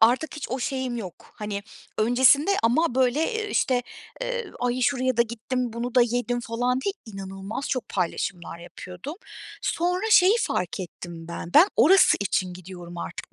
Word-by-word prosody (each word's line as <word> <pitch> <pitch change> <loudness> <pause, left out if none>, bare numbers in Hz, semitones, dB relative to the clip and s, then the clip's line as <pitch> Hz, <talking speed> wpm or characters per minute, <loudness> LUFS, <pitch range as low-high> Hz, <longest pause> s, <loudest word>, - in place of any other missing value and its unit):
artık 250 +8 +3
hiç 295 - -5
o 255 - -1
şeyim 260 -2 -2
yok. 190 -7 -9
Hani, 210 -3 -4 0.4
öncesinde 260 - +5
ama, 245 +5 +2
böyle, 260 +2 +2
eee, 430 -2 -3
işte, 250 -1 +1 0.4
eee, - - -3
"Ay, 245 +1 0
şuraya 255 -1 +1
da 235 - +6
gittim, 235 +1 -3
bunu 235 +1 -4
da 255 - +6
yedim." 245 +1 -1
falan 245 +2 -1
diye, 395 +8 -1
inanılmaz 195 +4 -6
çok 255 -3 -2
paylaşımlar 180 -1 -3
yapıyordum. 180 - -9 0.5
Sonra 360 +4 0
şeyi 380 0 +7
fark 180 +2 -2
ettim 170 -2 -8
ben: 170 0 -6
Ben 345 +6 +8
orası 350 - +6
için 190 -2 0
gidiyorum 175 -1 -10
artık 170 - -7
240 Hz, 160 wpm, -25 LUFS, 195-265 Hz, 0.5 s, Ben